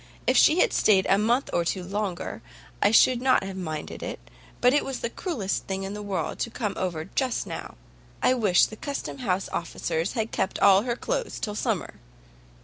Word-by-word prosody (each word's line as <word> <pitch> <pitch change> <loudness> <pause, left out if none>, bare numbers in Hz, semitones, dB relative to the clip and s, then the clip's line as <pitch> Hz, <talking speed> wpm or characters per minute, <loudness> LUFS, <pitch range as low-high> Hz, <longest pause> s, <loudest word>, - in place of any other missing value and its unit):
If - - +3
she 325 +4 +6
had - - +2
stayed 195 -3 +4
a 195 - +4
month 240 +5 +1
or 170 - +2
two 180 +2 -2
longer, 195 -1 -4 0.4
I 205 - +5
should 240 +3 +5
not 260 -5 +3
have 195 0 -6
minded 155 -5 -5
it, - - -7 0.3
but 250 +1 +4
it 290 - +3
was 270 -2 -5
the 235 - -2
cruellest 240 - -3
thing 195 0 -3
in 195 +1 -4
the 210 - -6
world 200 -2 -3
to - - -1
come 220 -3 -3
over 170 -4 -3
just 255 +3 -1
now. - - -7 0.4
I - - +3
wish 210 -8 +4
the 215 - -9
Custom 280 +1 -5
house 195 -6 -1
officers 165 +1 -2
had 225 -3 -2
kept 190 - -1
all 195 -1 +6
her 240 +1 -2
cloaths 475 - -3
till 210 - -3
summer." 210 - -2
205 Hz, 200 wpm, -26 LUFS, 190-245 Hz, 0.4 s, she